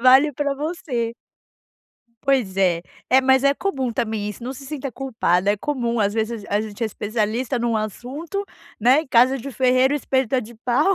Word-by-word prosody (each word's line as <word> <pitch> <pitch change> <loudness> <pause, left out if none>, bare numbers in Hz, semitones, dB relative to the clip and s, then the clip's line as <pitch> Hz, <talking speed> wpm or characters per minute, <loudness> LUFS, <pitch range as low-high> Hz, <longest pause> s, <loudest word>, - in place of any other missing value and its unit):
Vale 265 +4 +6
para 285 0 -1
você. 280 -6 -3 1.1
Pois 250 -9 +1
é. 175 -3 +2 0.3
É, 260 +1 +7
mas 265 +1 +4
é 280 - +5
comum 270 -8 -2
também 220 -2 -2
isso, 220 - -10
não 260 +2 -4
se 275 +1 -10
sinta 275 -2 -5
culpada, 220 -7 +1
é - - -2
comum 240 -5 -1
às 205 0 +1
vezes 225 -1 -2
a 205 - +1
gente 215 +1 -7
é - - +2
especialista 220 +4 -1
num 235 -1 0
assunto, 270 - -4 0.4
né, 260 +7 +5
em - - -14
casa 255 +2 +4
de 275 +2 -6
ferreiro 255 +1 +3
o - - +2
espeto 265 -3 0
é - - +2
de 235 0 -10
pau 255 - +2
250 Hz, 190 wpm, -22 LUFS, 220-275 Hz, 1.1 s, É